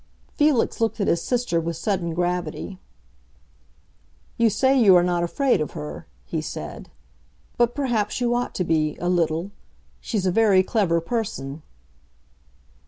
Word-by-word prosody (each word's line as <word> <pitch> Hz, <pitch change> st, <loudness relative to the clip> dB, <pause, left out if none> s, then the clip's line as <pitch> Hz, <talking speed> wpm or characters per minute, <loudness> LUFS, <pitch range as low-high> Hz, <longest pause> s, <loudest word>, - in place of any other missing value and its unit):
Felix 290 Hz, -6 st, +2 dB
looked 225 Hz, 0 st, 0 dB
at 200 Hz, -, +1 dB
his 170 Hz, -, +2 dB
sister 245 Hz, -9 st, 0 dB
with 165 Hz, +1 st, -3 dB
sudden 175 Hz, -4 st, -2 dB
gravity. 180 Hz, +1 st, -3 dB, 1.6 s
"You 230 Hz, -1 st, +3 dB
say 265 Hz, +6 st, +2 dB
you 215 Hz, -8 st, +6 dB
are 175 Hz, -, +5 dB
not 175 Hz, -1 st, +1 dB
afraid 245 Hz, -, +1 dB
of 150 Hz, -, -3 dB
her," 75 Hz, -1 st, -7 dB, 0.2 s
he -, -, -3 dB
said. -, -, -7 dB, 0.7 s
"But 240 Hz, 0 st, +2 dB
perhaps 240 Hz, -7 st, -1 dB
you 240 Hz, -1 st, +1 dB
ought 245 Hz, 0 st, -2 dB
to 180 Hz, -, 0 dB
be—a 160 Hz, 0 st, 0 dB
little. 170 Hz, +1 st, 0 dB, 0.5 s
She's 205 Hz, -5 st, -2 dB
a 185 Hz, -, +2 dB
very 200 Hz, -2 st, +4 dB
clever 185 Hz, -5 st, +1 dB
person." 160 Hz, -, -4 dB
185 Hz, 140 wpm, -23 LUFS, 170-235 Hz, 1.6 s, you